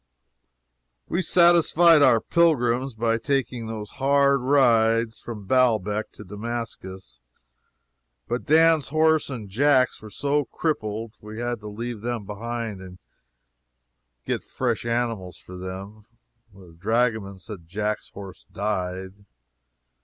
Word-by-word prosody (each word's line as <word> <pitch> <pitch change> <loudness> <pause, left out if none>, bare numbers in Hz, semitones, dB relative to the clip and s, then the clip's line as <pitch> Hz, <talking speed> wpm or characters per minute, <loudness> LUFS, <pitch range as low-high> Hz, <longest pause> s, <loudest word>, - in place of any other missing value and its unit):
We 175 - 0
satisfied 170 -2 +5
our 130 -5 +6
pilgrims 130 -6 +1
by 115 0 0
making 125 -4 -1
those 110 -2 -6
hard 140 0 +3
rides 115 -4 +3
from 105 -4 -8
Baalbec 110 -3 +1
to - - -11
Damascus, 100 - -7 1.1
but 120 - -2
Dan's 160 0 +4
horse 155 +1 +2
and 120 -6 -6
Jack's 130 +4 +2
were 110 - -10
so 145 +5 0
crippled 110 -7 -3
we 105 +1 -9
had 120 -1 -2
to 105 - -10
leave 115 +1 -6
them 120 -2 -3
behind 110 0 -5
and 90 -1 -11 1.3
get - - -2
fresh - - -2
animals 115 -6 -2
for 90 - -12
them. 95 +3 -8 0.5
The 95 -4 -16
dragoman 110 0 0
says 100 +1 -9
Jack's 105 +4 -3
horse 100 -2 -11
died. 95 -1 -4
115 Hz, 115 wpm, -24 LUFS, 105-130 Hz, 1.3 s, our